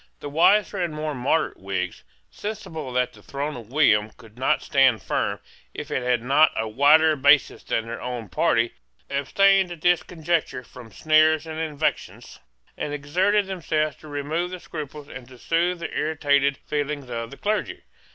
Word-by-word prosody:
The 145 - -6
wiser 195 +5 +3
and 165 -3 -3
more 155 0 -3
moderate 140 +5 0
Whigs, 95 0 -4 0.3
sensible 160 -9 -6
that 125 0 0
the - - -16
throne 145 +2 -4
of 115 -1 -11
William 110 -8 +3
could 110 -1 -18
not 130 +2 0
stand 130 -5 +3
firm - - -1 0.4
if 150 0 -7
it 130 - 0
had 125 -2 0
not 140 +5 +4
a 110 - -1
wider 150 +7 +5
basis 140 0 +3
than 115 - -2
their 115 +1 -6
own 120 -3 -5
party, 115 - +1 0.4
abstained 190 +7 +3
at 170 -3 -9
this 175 0 +3
conjuncture 165 -6 -2
from 120 -2 -13
sneers 155 +3 +3
and 160 -1 -6
invectives, 155 -1 -3 0.4
and 145 - -4
exerted 185 +9 +1
themselves 155 -5 -1
to 155 - -14
remove 150 +4 -2
the 180 0 -7
scruples 150 -3 -8
and 125 - -10
to 130 -1 -14
soothe 170 +5 0
the - - -5
irritated 140 -3 +1
feelings 145 -2 -3
of 115 -1 -5
the 140 - -11
clergy. 210 +1 -2
150 Hz, 170 wpm, -24 LUFS, 125-160 Hz, 0.4 s, wider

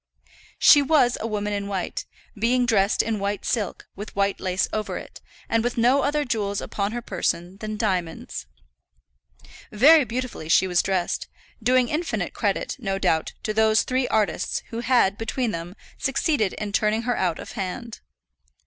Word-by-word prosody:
She 290 - +7
was 275 -4 +3
a 225 - -2
woman 210 -1 -2
in 200 0 -3
white, 190 -3 -3 0.3
being 245 +4 +2
dressed 205 -4 +3
in 220 -2 -2
white 200 0 -2
silk, 210 -5 -2
with 205 +2 -8
white 200 0 +1
lace 185 0 0
over 215 0 -2
it, - - -10 0.3
and 230 0 +1
with 245 0 -2
no 250 +4 +4
other 295 +1 0
jewels 205 -4 -1
upon 200 0 -3
her 240 +1 -4
person 175 -1 -2
than 215 0 -5
diamonds. 180 - -2 1.2
Very 290 +8 +7
beautifully 245 -9 -5
she 190 - +5
was 180 -2 +2
dressed; 185 -2 -1 0.3
doing 250 +2 +3
infinite 320 +5 -2
credit, - - -1
no 195 -5 -2
doubt, 160 -4 0
to 215 - -1
those 220 0 +4
three 255 0 0
artists 215 -2 0
who 230 - -4
had, 235 -5 +2
between 225 +1 -1
them, 170 +1 -6 0.2
succeeded 270 - +1
in 210 -1 -5
turning 215 +2 +1
her 245 0 0
out 175 -5 0
of - - -8
hand. 215 +3 -5
215 Hz, 165 wpm, -24 LUFS, 195-245 Hz, 1.2 s, She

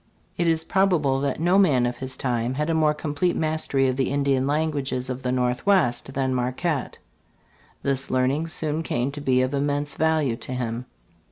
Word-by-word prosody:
It 170 - 0
is 160 -1 +2
probable 165 -8 +2
that 140 0 -1
no 175 +4 +3
man 135 -11 +4
of 120 0 -2
his 130 0 -4
time 120 -1 -1
had 150 +3 -1
a - - +1
more 155 -1 +2
complete 150 +4 -1
mastery 155 -4 +1
of 130 0 -1
the 135 - +1
Indian 140 -1 +1
languages 140 -4 -1
of 130 +1 -5
the 125 - -1
Northwest 125 +2 +1
than 130 -1 0
Marquette. 130 +4 -2 0.9
This 135 0 -1
learning 130 +5 +1
soon 155 -1 -2
came 125 -4 -1
to 145 +1 -7
be 130 -2 +2
of 130 +2 -2
immense 145 0 -1
value 155 -6 +1
to 130 - -6
him. 120 -1 -3
140 Hz, 180 wpm, -24 LUFS, 130-155 Hz, 0.9 s, man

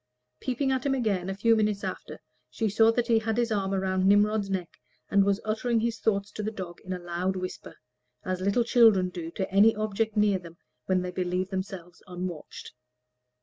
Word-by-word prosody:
Peeping 265 +2 -1
at 260 -1 0
him 275 -1 +1
again, 200 -7 -1
a 195 - -3
few 225 +3 +3
minutes 210 -2 0
after, - - -6 0.3
she 225 - -1
saw 225 +2 +5
that 235 +1 0
he 230 -2 +3
had 220 0 -2
his 240 -1 +1
arm 195 -2 0
round 190 -1 0
Nimrod's 205 0 +3
neck, 185 -3 -4 0.3
and 200 -1 +5
was 200 +1 +1
uttering 225 +2 0
his 230 -1 -1
thoughts 200 -2 0
to - - -6
the 215 - -2
dog 185 -5 -8
in 185 - -7
a 185 - -1
loud 175 +2 -2
whisper, 185 0 -6 0.5
as 185 0 -2
little 200 +5 +2
children 225 -6 +5
do 170 -2 -6
to 190 +3 -3
any 210 +3 +6
object 215 +1 -2
near 205 -2 +3
them 170 -1 -13 0.3
when 185 -1 +1
they 180 - -4
believe 180 +1 -2
themselves 185 -2 -6
unwatched. 180 -3 -7
200 Hz, 195 wpm, -27 LUFS, 185-220 Hz, 0.5 s, any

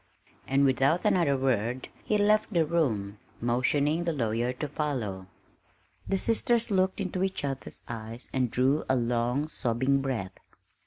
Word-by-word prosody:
And 135 +1 +3
without 135 +5 +2
another 160 -7 +3
word 125 -1 -1
he 215 - +1
left 210 +2 +3
the 170 -5 +2
room, 110 -12 -1 0.2
motioning 140 +7 +1
the 170 - 0
lawyer 120 -2 0
to 145 +4 -4
follow. 120 -11 -3 0.8
The 195 - +1
sisters 230 +2 +2
looked 190 0 +1
into 185 -2 -2
each 190 -5 -1
other's 135 -1 -5
eyes 115 +1 -7
and 130 -2 +1
drew 130 +6 +2
a 130 - +4
long, 120 +4 0
sobbing 130 0 0
breath. 115 -9 -3
135 Hz, 145 wpm, -28 LUFS, 120-170 Hz, 0.8 s, a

